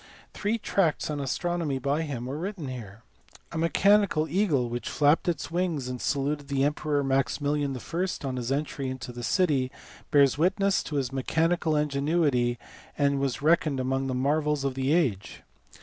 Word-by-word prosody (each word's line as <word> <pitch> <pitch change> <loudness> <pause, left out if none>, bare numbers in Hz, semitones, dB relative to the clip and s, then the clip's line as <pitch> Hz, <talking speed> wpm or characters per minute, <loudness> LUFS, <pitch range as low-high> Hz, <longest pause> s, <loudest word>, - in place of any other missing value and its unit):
Three 210 +3 -1
tracts 185 -8 0
on 145 - -3
astronomy 155 +1 -1
by 140 +4 0
him 135 -6 -4
were 135 +4 -4
written 180 -5 -4
here. 110 -4 -8 0.5
A 165 - -5
mechanical 180 -1 +3
eagle, 155 -7 +1
which 120 -1 -4
flapped 150 +3 +3
its 165 -1 -3
wings 170 -7 -1
and 125 -1 -5
saluted 145 0 -1
the 140 -1 0
Emperor 145 0 0
Maximilian 140 +1 0
I. 170 +8 -2 0.2
on 130 -1 -3
his 125 +1 -3
entry 140 -1 -2
into 130 -2 -6
the 120 0 -8
city, 140 -3 +1 0.4
bears 140 -1 +4
witness 195 +3 +2
to 150 - -5
his 135 -3 -1
mechanical 160 +4 +1
ingenuity 140 -4 +1 0.4
and 140 -1 +2
was 135 0 -2
reckoned 155 -3 +3
among 135 +1 -1
the 130 - -2
marvels 150 +2 +1
of 135 -1 0
the 135 +1 -1
age. 135 - 0
145 Hz, 165 wpm, -27 LUFS, 130-160 Hz, 0.5 s, bears